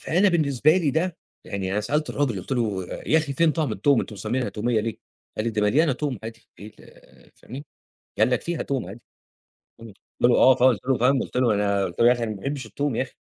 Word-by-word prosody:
فأنا 185 Hz, +5 st, +2 dB
بالنسبة 155 Hz, -2 st, +2 dB
لي 165 Hz, -6 st, +1 dB
ده، 165 Hz, +3 st, -1 dB, 0.3 s
يعني 95 Hz, -2 st, -4 dB
أنا 105 Hz, -, 0 dB
سألت 150 Hz, +8 st, -1 dB
الراجل 125 Hz, -9 st, -1 dB
قُلت 90 Hz, -, -7 dB
له: 105 Hz, -7 st, -1 dB, 0.2 s
"يا 160 Hz, -, +4 dB
أخي 150 Hz, -3 st, -2 dB
فين 165 Hz, +4 st, +3 dB
طعم 155 Hz, -3 st, -1 dB
توم 140 Hz, -4 st, +2 dB
أنتم 105 Hz, -, -7 dB
مسمينها 125 Hz, +5 st, -2 dB
تومية 110 Hz, +1 st, -1 dB
ليه"، 115 Hz, 0 st, -4 dB, 0.4 s
قال 110 Hz, -, -2 dB
لي: -, -, +1 dB
"ده 105 Hz, -2 st, -1 dB
مليانة 140 Hz, +8 st, +3 dB
توم 130 Hz, -3 st, -3 dB
عادي 115 Hz, +1 st, -9 dB, 0.2 s
إيه 105 Hz, +1 st, -11 dB
ال"، -, -, -20 dB
فاهمني، 135 Hz, +5 st, -10 dB, 0.5 s
قال 110 Hz, +3 st, +3 dB
لك: 125 Hz, -, 0 dB
"فيها 170 Hz, -2 st, -3 dB
توم 135 Hz, -8 st, -3 dB
عادي". 110 Hz, +5 st, -10 dB, 0.8 s
امم، 110 Hz, -3 st, -11 dB, 0.3 s
قُلت 120 Hz, -, +6 dB
له: -, -, +4 dB
"آه 130 Hz, -1 st, +6 dB
خالص" 125 Hz, -3 st, +3 dB
قُلت 130 Hz, -, -9 dB
له 130 Hz, -, +2 dB
فاهم، 130 Hz, +2 st, +2 dB
قُلت -, -, -5 dB
له: 125 Hz, -3 st, +3 dB
"أنا" 100 Hz, -1 st, 0 dB
قُلت 85 Hz, -, -8 dB
له: 120 Hz, -, +6 dB
"يا 120 Hz, -, +7 dB
أخي 120 Hz, -1 st, -4 dB
أنا 110 Hz, -, -3 dB
ما 105 Hz, -, -6 dB
باحبش 135 Hz, +4 st, -4 dB
التوم 140 Hz, +4 st, -3 dB
يا -, -, 0 dB
أخي"، 130 Hz, -, -6 dB
125 Hz, 245 wpm, -24 LUFS, 110-145 Hz, 0.8 s, يا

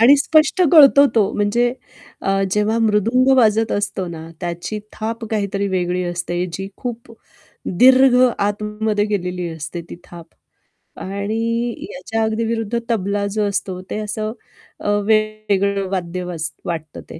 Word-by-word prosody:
आणि 265 Hz, +5 st, +7 dB
स्पष्ट 310 Hz, +5 st, +3 dB
कळतो 280 Hz, -2 st, +8 dB
तो 210 Hz, -3 st, +3 dB
म्हणजे 235 Hz, +4 st, +1 dB, 0.5 s
अ, 195 Hz, 0 st, 0 dB
जेव्हा 210 Hz, +3 st, +1 dB
मृदुंग 225 Hz, +4 st, +2 dB
वाजत 225 Hz, -2 st, +3 dB
असतो 200 Hz, -2 st, -2 dB
ना, 165 Hz, -1 st, -8 dB
त्याची 175 Hz, +4 st, -4 dB
थाप 225 Hz, +1 st, -4 dB
काहीतरी 200 Hz, -2 st, -1 dB
वेगळी 180 Hz, -1 st, -1 dB
असते, 175 Hz, 0 st, -2 dB
जी 195 Hz, +3 st, -5 dB
खूप 235 Hz, -1 st, -6 dB, 0.7 s
दीर्घ 260 Hz, 0 st, +7 dB, 0.2 s
आतमध्ये 210 Hz, +1 st, -1 dB
गेलेली 180 Hz, -4 st, -2 dB
असते 160 Hz, +1 st, -6 dB
ती -, -, -7 dB
थाप. 170 Hz, -1 st, -12 dB, 0.7 s
आणि 200 Hz, +3 st, -4 dB, 0.6 s
याच्या 225 Hz, -5 st, -3 dB
अगदी 220 Hz, +1 st, -1 dB
विरुद्ध 225 Hz, 0 st, -1 dB
तबला 200 Hz, -2 st, 0 dB
जो 210 Hz, +1 st, 0 dB
असतो, 190 Hz, -2 st, -3 dB
ते -, -, -3 dB
असं 215 Hz, 0 st, -3 dB, 0.5 s
अ, -, -, -3 dB, 0.2 s
वेगळं 210 Hz, -2 st, +1 dB
वाद्य 180 Hz, -1 st, -3 dB
वाज 165 Hz, -3 st, -4 dB, 0.2 s
वाटतं 160 Hz, -3 st, -5 dB
ते. -, -, -9 dB
205 Hz, 135 wpm, -19 LUFS, 185-225 Hz, 0.7 s, कळतो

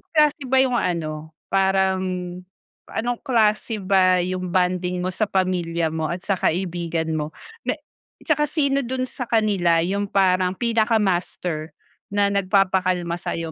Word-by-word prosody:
klase 300 Hz, -3 st, +3 dB
ba 265 Hz, +1 st, +4 dB
'yong 250 Hz, -2 st, +1 dB
ano, 160 Hz, -3 st, -3 dB, 0.2 s
parang, 190 Hz, -1 st, +2 dB, 0.9 s
anong 240 Hz, +1 st, -2 dB
klase 220 Hz, -4 st, +1 dB
ba 185 Hz, -2 st, +4 dB
'yong 185 Hz, 0 st, -3 dB
bonding 180 Hz, 0 st, 0 dB
mo 185 Hz, -, -1 dB
sa 215 Hz, +3 st, 0 dB
pamilya 175 Hz, -4 st, 0 dB
mo 160 Hz, -1 st, -2 dB
at 175 Hz, +3 st, -4 dB
sa 195 Hz, -3 st, -1 dB
kaibigan 170 Hz, -2 st, -1 dB
mo 155 Hz, 0 st, -3 dB, 0.3 s
na -, -, +1 dB, 0.5 s
'tsaka 300 Hz, -2 st, +1 dB
sino 280 Hz, -2 st, +1 dB
do'n 255 Hz, 0 st, -2 dB
sa 245 Hz, -1 st, -5 dB
kanila 190 Hz, -7 st, +2 dB
'yong 200 Hz, +3 st, -1 dB
parang 185 Hz, -1 st, +2 dB
pinaka-master 195 Hz, -8 st, 0 dB, 0.3 s
na 200 Hz, 0 st, +1 dB
nagpapakalma 185 Hz, -3 st, +1 dB
sa'yo? 165 Hz, -1 st, -4 dB
185 Hz, 135 wpm, -22 LUFS, 175-215 Hz, 0.9 s, ba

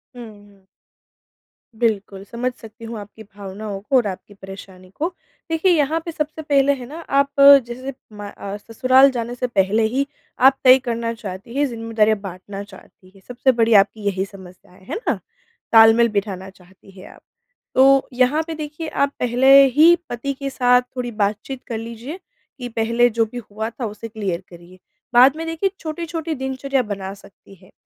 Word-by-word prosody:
हुँ, 240 Hz, -1 st, -8 dB, 0.2 s
हुँ। 195 Hz, -1 st, -24 dB, 1.1 s
बिल्कुल 205 Hz, -4 st, -1 dB
समझ 250 Hz, +2 st, -2 dB
सकती 225 Hz, -1 st, -13 dB
हूँ 230 Hz, 0 st, -6 dB
आपकी 210 Hz, +2 st, -12 dB
भावनाओं 200 Hz, 0 st, -8 dB
को 270 Hz, +7 st, -2 dB
और 245 Hz, -5 st, +3 dB
आपकी 195 Hz, +1 st, -8 dB
परेशानी 190 Hz, -1 st, -12 dB
को। 325 Hz, +3 st, -1 dB, 0.4 s
देखिए, 325 Hz, +3 st, +2 dB
यहाँ 315 Hz, -1 st, +2 dB
पे 335 Hz, -, -4 dB
सबसे 310 Hz, 0 st, -4 dB
पहले 280 Hz, -2 st, +2 dB
है 255 Hz, -2 st, -9 dB
ना, 310 Hz, +4 st, -9 dB
आप 280 Hz, 0 st, +2 dB, 0.4 s
जैसे 255 Hz, +3 st, -7 dB, 0.2 s
म 205 Hz, -, -10 dB
अ, 200 Hz, 0 st, -7 dB
ससुराल 255 Hz, +5 st, +4 dB
जाने 240 Hz, -1 st, -4 dB
से 250 Hz, +1 st, -2 dB
पहले 210 Hz, -1 st, +1 dB
ही 270 Hz, +4 st, -1 dB, 0.3 s
आप 270 Hz, +1 st, +5 dB
तय 255 Hz, 0 st, +8 dB
करना 235 Hz, -2 st, -3 dB
चाहती 205 Hz, +1 st, -9 dB
हैं, 290 Hz, -, +3 dB
ज़िम्मेदारियाँ 225 Hz, -3 st, 0 dB
बाँटना 195 Hz, +1 st, -8 dB
चाहती 190 Hz, -2 st, -17 dB
हैं। 195 Hz, -, -18 dB
सबसे 250 Hz, +2 st, +1 dB
बड़ी 230 Hz, -2 st, +2 dB
आपकी 210 Hz, +1 st, +4 dB
यही 190 Hz, -1 st, -1 dB
समस्या, 185 Hz, -3 st, -15 dB
है 190 Hz, -, -9 dB
ना? 460 Hz, -, -2 dB, 0.5 s
तालमेल 225 Hz, +1 st, +7 dB
बिठाना 200 Hz, -2 st, -3 dB
चाहती 190 Hz, +1 st, -20 dB
हैं -, -, -12 dB
आप। -, -, -20 dB, 0.5 s
तो 270 Hz, +1 st, +5 dB
यहाँ 255 Hz, +5 st, +2 dB
पे 330 Hz, -, -4 dB
देखिए, 305 Hz, +1 st, -6 dB
आप 280 Hz, -1 st, 0 dB
पहले 250 Hz, +2 st, +4 dB, 0.2 s
ही 325 Hz, +3 st, +7 dB
पति 245 Hz, +4 st, -3 dB
के 275 Hz, 0 st, -5 dB
साथ 250 Hz, -2 st, +3 dB
थोड़ी 245 Hz, -1 st, -4 dB
बातचीत 215 Hz, +5 st, -3 dB
कर 230 Hz, -, -4 dB
लीजिए 235 Hz, +9 st, -8 dB, 0.4 s
कि 245 Hz, -1 st, -5 dB
पहले 230 Hz, +1 st, +2 dB
जो 230 Hz, 0 st, +1 dB
भी 235 Hz, +3 st, -10 dB
हुआ 220 Hz, +2 st, -4 dB
था 235 Hz, +2 st, -6 dB
उसे 215 Hz, +1 st, -7 dB
क्लियर 200 Hz, -6 st, -4 dB
करिए। 175 Hz, +1 st, -15 dB, 0.3 s
बाद 255 Hz, +4 st, +6 dB
में 325 Hz, -, -5 dB
देखिए, 330 Hz, +4 st, -1 dB
छोटी-छोटी 330 Hz, 0 st, -4 dB
दिनचर्या 265 Hz, 0 st, -2 dB
बना 195 Hz, -3 st, -6 dB
सकती 200 Hz, 0 st, -18 dB
हैं। 185 Hz, 0 st, -22 dB
230 Hz, 175 wpm, -20 LUFS, 200-270 Hz, 1.1 s, तय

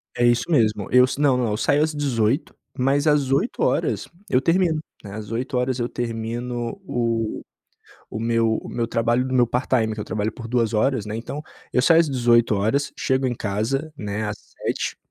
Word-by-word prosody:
É 120 Hz, -, 0 dB
isso 120 Hz, 0 st, +3 dB
mesmo, 110 Hz, -, +2 dB
eu 125 Hz, 0 st, +7 dB
s 130 Hz, -, -4 dB
Não, 140 Hz, -3 st, +4 dB
não. 120 Hz, -2 st, 0 dB
Eu 105 Hz, -, -1 dB
saio 145 Hz, +5 st, +2 dB
às 155 Hz, 0 st, +2 dB
18h, 130 Hz, -3 st, 0 dB, 0.2 s
mas 140 Hz, +4 st, +2 dB
às 145 Hz, -3 st, +3 dB
20h 140 Hz, -, 0 dB, 0.2 s
eu 125 Hz, -, +4 dB
termino, 165 Hz, 0 st, +2 dB, 0.2 s
né. 100 Hz, -, -9 dB
Às 110 Hz, 0 st, -7 dB
20h 125 Hz, +1 st, -1 dB
eu 120 Hz, -, -1 dB
termino 120 Hz, -, -4 dB
o 115 Hz, -4 st, -1 dB, 0.7 s
o 110 Hz, -, -5 dB
meu 115 Hz, -1 st, +2 dB
o -, -, -8 dB
meu 115 Hz, -1 st, -2 dB
trabalho 120 Hz, +2 st, +1 dB
no 130 Hz, -, -3 dB
meu 125 Hz, -1 st, +5 dB
part-time 120 Hz, -3 st, +1 dB
que 105 Hz, -, -8 dB
eu -, -, -2 dB
trabalho 110 Hz, 0 st, -2 dB
por 115 Hz, 0 st, -9 dB
2 115 Hz, -2 st, +1 dB
horas, 110 Hz, 0 st, +1 dB
né. 105 Hz, +1 st, -4 dB
Então, 130 Hz, +6 st, -5 dB, 0.3 s
eu -, -, +2 dB
saio 165 Hz, +4 st, +6 dB
às 160 Hz, -3 st, +3 dB
18h, 120 Hz, +1 st, +2 dB
chego 130 Hz, 0 st, +1 dB
em 120 Hz, -, -2 dB
casa, 115 Hz, +10 st, -2 dB
né, 105 Hz, -1 st, -4 dB
às 105 Hz, -, -5 dB, 0.2 s
19h -, -, -2 dB
120 Hz, 190 wpm, -23 LUFS, 115-135 Hz, 0.7 s, eu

